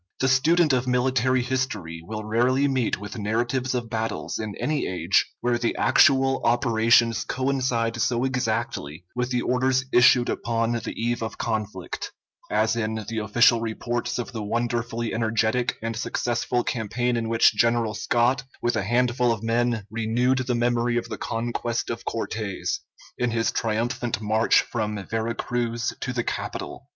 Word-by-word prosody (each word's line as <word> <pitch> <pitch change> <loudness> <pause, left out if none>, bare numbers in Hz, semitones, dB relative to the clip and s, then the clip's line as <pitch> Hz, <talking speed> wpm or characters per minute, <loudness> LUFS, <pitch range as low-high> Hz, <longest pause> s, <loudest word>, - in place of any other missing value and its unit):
The 130 - +2
student 150 +4 +4
of 130 0 +1
military 125 0 +2
history 125 - -3
will 110 +5 -6
rarely 125 +6 +2
meet 130 -4 0
with 105 +3 -7
narratives 120 +5 -1
of 120 -2 -2
battles 115 0 -3
in 110 -2 -4
any 150 -1 -1
age 90 +1 +1
where 120 -1 +1
the 120 - 0
actual 135 -1 +4
operations 115 -1 +3
coincide 125 -3 -1
so 120 -1 +1
exactly 115 - -2
with 125 0 -1
the 125 -1 0
orders 130 +1 +1
issued 120 0 +6
upon 115 0 -1
the 115 -1 -3
eve 120 +1 -1
of 110 - -4
conflict, 105 -5 -4 0.4
as 110 +1 +2
in 110 -1 -2
the 115 -1 -2
official 115 +2 +4
reports 120 +1 -2
of 120 0 -4
the 115 -3 -5
wonderfully 120 +1 -2
energetic 115 +1 0
and 115 0 -2
successful 120 +1 -1
campaign 120 +2 -1
in 115 -1 -2
which 115 0 +5
General 115 0 +2
Scott 120 +4 +1 0.2
with 120 - 0
a 110 - +1
handful 120 +3 +2
of 115 -1 -3
men 115 -1 0
renewed 120 +4 +1
the 125 - +1
memory 120 0 +1
of 115 -1 -3
the 110 - -4
conquest 120 +1 -2
of 115 - -6
Cortes, 110 -3 -3 0.4
in 125 - +1
his 115 0 0
triumphant 115 +1 -1
march 110 +1 +3
from 105 -4 -3
Vera 115 +1 -2
Cruz 120 -1 -2
to 125 - -3
the 120 -1 -1
capital. - - -5
120 Hz, 155 wpm, -25 LUFS, 110-125 Hz, 0.4 s, issued